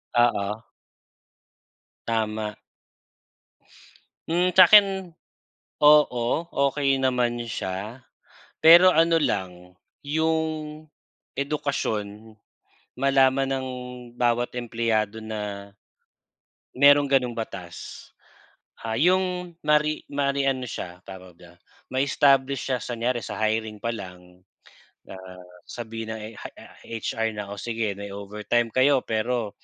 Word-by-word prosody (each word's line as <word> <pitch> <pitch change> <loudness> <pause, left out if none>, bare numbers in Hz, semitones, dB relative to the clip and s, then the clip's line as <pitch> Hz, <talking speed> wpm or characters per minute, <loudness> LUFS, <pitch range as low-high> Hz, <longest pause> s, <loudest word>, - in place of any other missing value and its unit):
Oo. 110 -3 +1 1.4
Tama. 110 -2 -2 1.7
Hmm. 175 +2 +1
Sa'kin 190 0 +6 0.7
oo, 150 -5 +5 0.4
okey 135 -1 0
naman 125 -2 0
siya 105 +5 -5 0.5
pero 170 +3 +8
ano 165 -1 +3
lang 90 -5 -3 0.3
yung 155 0 -2 0.6
edukasyon 110 -7 -3 0.7
malaman 135 0 +3
ng 135 -1 -2 0.5
bawat 120 0 0
empleyado 115 -3 -1
na 105 -2 -6 1.1
mayrong 140 +1 +6
ganong 130 -3 +2
batas, 100 -7 -8 0.8
ah, 110 - -2
'yong 180 +1 +1
mari 150 0 +1
mari 140 -1 0
ano 130 -2 -1
siya, 90 -2 -7
tawag 95 -2 -11
do'n, 85 -1 -17 0.3
ma-establish 135 0 +2
siya 130 - +1
sa 120 - -5
kunyari 120 0 -2
sa - - -6
hiring 110 -1 -1
pa 115 - -2
lang, 90 -4 -9 0.7
ah, 95 -1 -11 0.2
sabihin 115 -1 -7
ng 110 - -6
ey 105 +1 -8
ah, - - -12
HR 115 0 -3
na, 105 -1 -6
"Oh, 100 - -7
sige 115 -4 -3
may 100 0 -8
overtime 105 +4 -2
kayo 130 +3 +3
pero 115 -1 -2
120 Hz, 100 wpm, -24 LUFS, 105-140 Hz, 1.7 s, pero